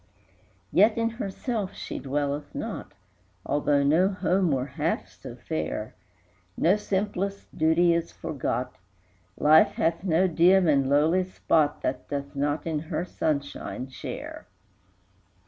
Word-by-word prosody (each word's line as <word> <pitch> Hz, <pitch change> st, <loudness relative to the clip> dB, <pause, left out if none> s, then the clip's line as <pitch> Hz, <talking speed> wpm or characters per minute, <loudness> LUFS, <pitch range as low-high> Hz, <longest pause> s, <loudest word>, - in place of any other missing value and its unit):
III. -, -, -35 dB
Yet 215 Hz, +2 st, +5 dB
in 230 Hz, 0 st, +1 dB
herself 215 Hz, -1 st, -4 dB
she -, -, -6 dB
dwelleth 145 Hz, +1 st, -3 dB
not, -, -, -5 dB, 0.5 s
Although 145 Hz, 0 st, +2 dB
no 165 Hz, +7 st, +4 dB
home 185 Hz, -2 st, +1 dB
were 130 Hz, -3 st, 0 dB
half 135 Hz, -, -2 dB
so -, -, -11 dB
fair; 80 Hz, +7 st, -4 dB, 0.6 s
No 175 Hz, +5 st, +4 dB
simplest 200 Hz, -1 st, -3 dB
duty 165 Hz, +2 st, +4 dB
is 170 Hz, 0 st, -1 dB
forgot, 130 Hz, -5 st, -3 dB, 0.6 s
Life 155 Hz, +2 st, +5 dB
hath 165 Hz, +2 st, 0 dB
no 185 Hz, 0 st, +3 dB
dim 180 Hz, +2 st, +4 dB
and 140 Hz, -3 st, +3 dB
lowly 155 Hz, +6 st, +3 dB
spot 160 Hz, -5 st, 0 dB
That -, -, -2 dB
doth 140 Hz, 0 st, -4 dB
not 145 Hz, +2 st, -1 dB
in 160 Hz, -2 st, -1 dB
her 160 Hz, +2 st, -3 dB
sunshine 140 Hz, -5 st, -3 dB
share. 130 Hz, -, -7 dB
160 Hz, 130 wpm, -26 LUFS, 145-185 Hz, 0.6 s, Yet